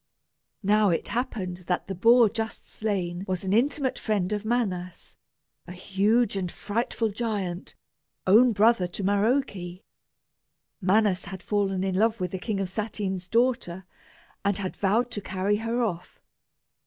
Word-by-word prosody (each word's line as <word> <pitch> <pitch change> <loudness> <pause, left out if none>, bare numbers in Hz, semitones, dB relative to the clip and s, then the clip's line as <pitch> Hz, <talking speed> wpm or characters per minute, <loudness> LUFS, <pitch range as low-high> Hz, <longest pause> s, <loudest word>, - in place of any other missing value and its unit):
Now 210 +1 +4
it 170 - -1
happened 215 -7 -3
that 180 - 0
the 195 - -3
boar 230 +5 +6
just 220 +1 -4
slain 185 -4 -3
was 185 -1 -2
an 190 0 -1
intimate 265 +3 +1
friend 210 -3 0
of 210 0 -2
Manas, 195 -7 -2 0.5
a 180 - -7
huge 200 +5 +1
and 185 -3 -2
frightful 225 +1 -2
giant, 200 -5 -3 0.5
own 230 +6 +6
brother 215 -2 +3
to 180 +3 -6
Maroke. 220 +8 +2 1.3
Manas 195 0 +2
had 190 -1 -8
fallen 195 -3 0
in 190 -1 -1
love 220 +4 +2
with 180 -1 -2
the 190 - -4
King 205 +1 -2
of 195 - -1
Satyn's 190 -2 -3
daughter, 225 -6 0 0.6
and 200 -1 +1
had 190 -2 -4
vowed 225 +5 +1
to 205 - -3
carry 190 +2 0
her 230 +3 -1
off. 180 -5 -4
205 Hz, 145 wpm, -26 LUFS, 185-225 Hz, 1.3 s, boar